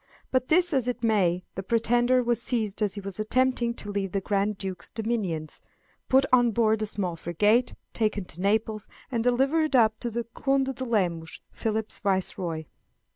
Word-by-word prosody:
Be 255 - +4
this 350 +1 +3
as 260 -3 +1
it 245 -1 -3
may, 185 -6 +2
the 195 - -4
pretender 240 +4 +2
was 235 -1 +1
seized 220 -4 -1
as 205 -1 0
he 200 - -5
was 195 0 -5
attempting 240 +1 +1
to 205 - -6
leave 195 -2 -2
the 195 - +1
Grand 200 +1 0
Duke's 190 -3 -5
dominions, 210 -9 -3 0.5
put 265 +1 +5
on 245 -1 +6
board 220 -1 +2
a 215 - -1
small 185 -5 -3
frigate, 210 +9 +1 0.2
taken 210 -3 0
to 175 0 -10
Naples, 215 +1 0 0.2
and 230 -2 0
delivered 270 +5 +2
up 220 -3 +4
to 240 - -3
the 235 +1 -3
Conde 270 +3 0
de 260 - -5
Lemos, 175 -8 -1
Philip's 220 -1 -3
viceroy. 185 -4 -1
220 Hz, 175 wpm, -27 LUFS, 195-245 Hz, 0.5 s, on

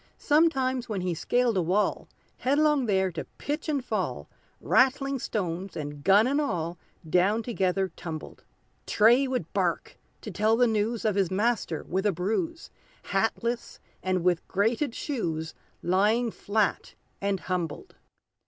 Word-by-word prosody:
Sometimes 265 -6 +2
when 200 -4 -2
he 180 -1 -1
scaled 245 +7 +1
a - - +3
wall, 185 +5 0 0.3
Headlong 285 -1 +2
there 190 -2 +2
to 165 - -5
pitch 295 +2 -3
and 280 -4 -1
fall, - - -2 0.3
Ratling 270 +1 +2
stones, 185 -4 -3
and 145 -1 -6
gun 200 +3 +6
and 280 +4 +1
all. 175 - -2 0.3
Down 190 +7 +2
together 190 -4 0
tumbled. 160 -3 -8 0.4
Tray 240 +6 +5
would 255 -1 -3
bark - - -1 0.2
to - - -7
tell 220 +1 +2
the 245 - +5
news 220 0 0
Of 215 - +3
his 195 -3 +1
master 205 -5 0
with 190 +3 -1
a - - +3
bruise, 220 - -2 0.4
Hatless, 230 +4 -1 0.2
and 185 -2 0
with 180 -1 +1
grated 230 +6 0
shoes, 165 - -3 0.3
Lying 215 +6 +2
flat 210 0 -1 0.3
and 200 -1 0
humbled! 175 -5 -4
210 Hz, 140 wpm, -27 LUFS, 185-245 Hz, 0.4 s, gun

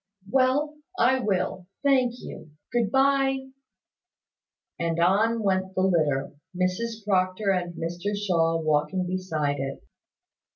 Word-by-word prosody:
"Well, 270 +6 +2 0.2
I 260 -4 +4
will, 185 -4 -1 0.2
thank 260 -4 +3
you. - - -9 0.2
Good 235 -4 +2
bye." 270 0 +2 1.3
And 165 0 -1
on 215 +6 +3
went 190 -1 0
the 185 - +1
litter, 155 -7 +1 0.2
with 185 0 +2
Mrs 225 +2 -5
Proctor 190 0 +1
and 175 -2 -2
Mr 175 +5 -3
Shaw 165 -5 +1
walking 155 +4 0
beside 160 -6 -2
it. 135 0 -5
190 Hz, 120 wpm, -26 LUFS, 170-235 Hz, 1.3 s, I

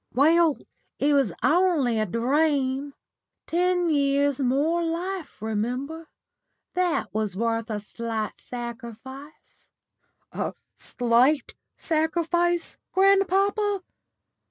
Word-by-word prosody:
"Well, 320 +3 +4 0.4
it 290 +1 +2
was 275 -8 +3
only 305 -9 +3
a 215 - 0
dream. 275 - 0 0.5
Ten 355 +1 +1
years 285 -2 +2
more 285 +6 +1
life, 340 +1 -4
remember. 250 +9 -3 0.6
That 360 - 0
was 210 -3 -2
worth 230 +1 -1
a 215 -1 -2
slight 220 +1 -5
sacrifice." 245 +4 -9 0.6
"A - - -3 0.2
slight 245 +3 +1 0.2
sacrifice, 340 +2 0
grandpapa!" 390 +1 +3
285 Hz, 85 wpm, -25 LUFS, 240-340 Hz, 0.6 s, Well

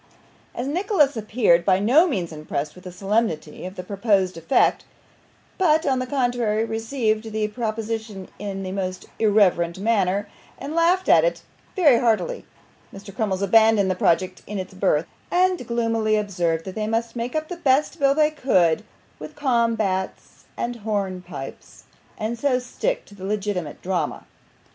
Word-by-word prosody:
As 245 - -3
Nicholas 310 - +2
appeared 215 -6 +2
by 185 +1 +3
no 255 - +4
means 185 - -2
impressed 150 -1 -4
with 180 +2 -16
the 180 - -6
solemnity 195 -5 -2
of 185 - -9
the 180 - -6
proposed 195 -1 +1
effect, 165 +10 +2 0.8
but, 320 -3 +3
on 260 -2 +1
the 255 - -3
contrary, 245 -5 0
received 225 -1 -1
the 215 0 -1
proposition 220 -3 -4
in 195 -1 -5
a 185 - -4
most 185 -1 -4
irreverent 195 -6 +3
manner, 200 -1 +1 0.3
and 290 - -6
laughed 345 +3 +2
at - - +6
it - - -1 0.3
very 295 -10 +5
heartily, 245 - 0 0.5
Mr. 195 0 -11
Crummles 200 -4 -1
abandoned 220 -1 +4
the - - -1
project 185 +1 +1
in 210 - -4
its 185 0 -6
birth, 185 -5 +1 0.2
and 360 -7 +1
gloomily 230 -2 +1
observed 175 -6 -1
that 190 - -6
they 215 +1 -3
must 230 +1 -1
make 240 +3 -4
up 310 0 -1
the 355 - -5
best 280 -2 +1
bill 275 -1 +3
they 305 0 +3
could 185 - +2 0.4
with 155 +1 -9
combats 230 -8 -1
and 240 0 -3
hornpipes, 185 -9 -5 0.3
and 225 +2 -3
so 270 -2 +2
stick 255 - -3
to - - -17
the 195 -2 -12
legitimate 195 -6 -3
drama. 175 -5 -2
215 Hz, 155 wpm, -23 LUFS, 190-245 Hz, 0.8 s, at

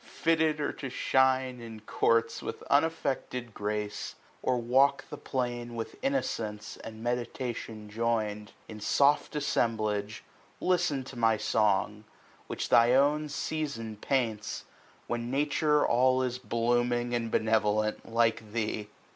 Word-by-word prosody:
fitted 160 -2 +1
or 145 - -1
to 135 - -6
shine 130 -1 +2
in 115 -2 -8
courts 115 +2 +1
5 - - -10
With - - -5
unaffected 135 -6 0
grace, 105 0 -3 0.3
or 125 - +1
walk 130 +4 +3
the - - -4
plain 120 -2 -3
With 115 -1 -5
innocence 110 - -2
and 110 0 -9
meditation 120 -2 -3
join'd 105 -1 -1 0.2
In 110 -1 -9
soft 140 +8 +2
assemblage, 110 -6 -1 0.4
listen 155 -7 +1
to 135 - -10
my 115 -2 +3
song, 105 0 +1 0.4
Which - - -3
tliy 120 +2 +6
own 150 +2 +3
Season 140 -7 -3
paints; 110 -2 -1 0.4
when 120 0 -3
Nature 150 +2 +2
all 130 +2 +3
Is 125 0 -2
blooming 120 0 0
and 115 -1 -1
benevolent, 110 0 +1
like 115 -2 +1
thee. 110 -2 -2
120 Hz, 125 wpm, -29 LUFS, 110-130 Hz, 0.4 s, tliy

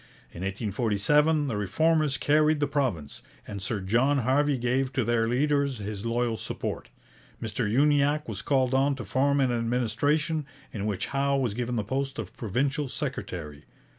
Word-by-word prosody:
In 85 - -9
1847 115 +10 +1
the 120 - -2
Reformers 150 - +1
carried 150 +1 +3
the 145 - +2
province, 115 - -2 0.3
and 100 -2 -6
Sir 105 +2 -2
John 120 +9 +2
Harvey 135 +3 +2
gave 125 +2 0
to 130 - +1
their 115 0 +1
leaders 140 +1 +1
his 105 +1 -5
loyal 115 -1 0
support. - - -5 0.5
Mr 110 -1 -2
Uniacke 145 +3 +3
was 110 -2 -4
called 130 -2 +1
on 135 +1 +3
to 120 -5 -7
form 140 +7 +2
an 130 -2 +2
administration, 125 +6 0 0.3
in 105 -1 -3
which 100 -3 -2
Howe 140 0 +2
was 125 -6 0
given 120 +2 -2
the 110 - 0
post 135 +4 -3
of 110 -5 -6
provincial 135 - -1
secretary. 85 - -5
130 Hz, 160 wpm, -27 LUFS, 110-145 Hz, 0.5 s, carried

